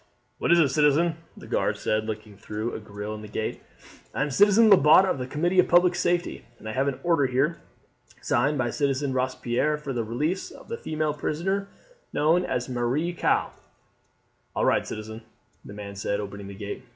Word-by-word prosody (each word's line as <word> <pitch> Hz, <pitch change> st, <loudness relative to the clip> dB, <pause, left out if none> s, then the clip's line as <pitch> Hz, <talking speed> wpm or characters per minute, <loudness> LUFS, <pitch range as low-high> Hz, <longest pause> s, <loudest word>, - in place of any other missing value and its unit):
"What -, -, +1 dB
is 170 Hz, -, +6 dB
it, 150 Hz, -4 st, +4 dB
citizen?" 150 Hz, +4 st, +3 dB, 0.2 s
the -, -, -11 dB
guard -, -, 0 dB
said 110 Hz, 0 st, -1 dB
looking 110 Hz, -1 st, -6 dB
through 105 Hz, +3 st, -5 dB
a -, -, -4 dB
grille 105 Hz, 0 st, -7 dB
in 105 Hz, -, -7 dB
the 105 Hz, -, -9 dB
gate. 110 Hz, +1 st, -4 dB, 0.5 s
"I -, -, +1 dB
am 150 Hz, -, -3 dB
Citizen 205 Hz, -, +5 dB
Lebat 180 Hz, 0 st, +7 dB
of 165 Hz, -, -1 dB
the 125 Hz, -, -4 dB
Committee 175 Hz, +7 st, +1 dB
of 180 Hz, -, +5 dB
Public 175 Hz, +1 st, +5 dB
Safety, 175 Hz, 0 st, -1 dB
and -, -, -11 dB
I -, -, -3 dB
have 135 Hz, +5 st, 0 dB
an 135 Hz, -2 st, -2 dB
order 165 Hz, -6 st, +3 dB
here, 135 Hz, +7 st, 0 dB, 0.6 s
signed 145 Hz, +5 st, +1 dB
by 120 Hz, -2 st, 0 dB
Citizen 140 Hz, -1 st, 0 dB
Robespierre, 130 Hz, +3 st, 0 dB
for 145 Hz, -2 st, -5 dB
the 120 Hz, -2 st, -1 dB
release 150 Hz, -, -2 dB
of -, -, -14 dB
the 465 Hz, -, -3 dB
female 155 Hz, -1 st, -1 dB
prisoner 190 Hz, +7 st, -2 dB, 0.4 s
known 165 Hz, +4 st, +2 dB
as 125 Hz, -7 st, -2 dB
Marie 130 Hz, +7 st, -1 dB
Caux." -, -, +1 dB, 1.0 s
"All -, -, +1 dB
right, -, -, +2 dB
citizen!" 110 Hz, +1 st, -7 dB, 0.4 s
the -, -, -11 dB
man 100 Hz, -1 st, -8 dB
said, 100 Hz, +1 st, -2 dB
opening 100 Hz, -1 st, -7 dB
the 100 Hz, -, -9 dB
gate. 105 Hz, +3 st, -6 dB
135 Hz, 190 wpm, -26 LUFS, 110-165 Hz, 1.0 s, Lebat